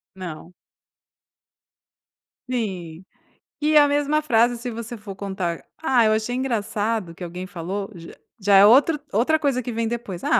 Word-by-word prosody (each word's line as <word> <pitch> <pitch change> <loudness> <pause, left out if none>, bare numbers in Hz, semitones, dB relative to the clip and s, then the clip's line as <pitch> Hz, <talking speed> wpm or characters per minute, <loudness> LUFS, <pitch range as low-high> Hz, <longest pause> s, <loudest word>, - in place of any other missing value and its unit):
Não. 175 -2 -8 2.0
Sim. 185 -8 -4 0.6
E 305 +1 +2
a 290 -1 +7
mesma 290 +1 +1
frase, 240 -4 +2
se 245 +1 -5
você 230 0 -6
for 205 -2 -9
contar 190 -4 -3 0.2
a 265 -6 +2
"ah, 225 - +6
eu 215 - +4
achei 220 +3 -1
engraçado, 220 -6 -2
que 180 - -9
alguém 180 +2 -6
falou", 195 +2 -5
j 165 -1 -11 0.2
já 200 -1 +3
é 195 - +9
outro 280 +7 +5
outra 285 +9 +2
coisa 275 -4 0
que 245 - -4
vem 225 0 -1
depois. 225 -6 -5
"Ah, 305 +3 +3
220 Hz, 160 wpm, -23 LUFS, 190-255 Hz, 2.0 s, é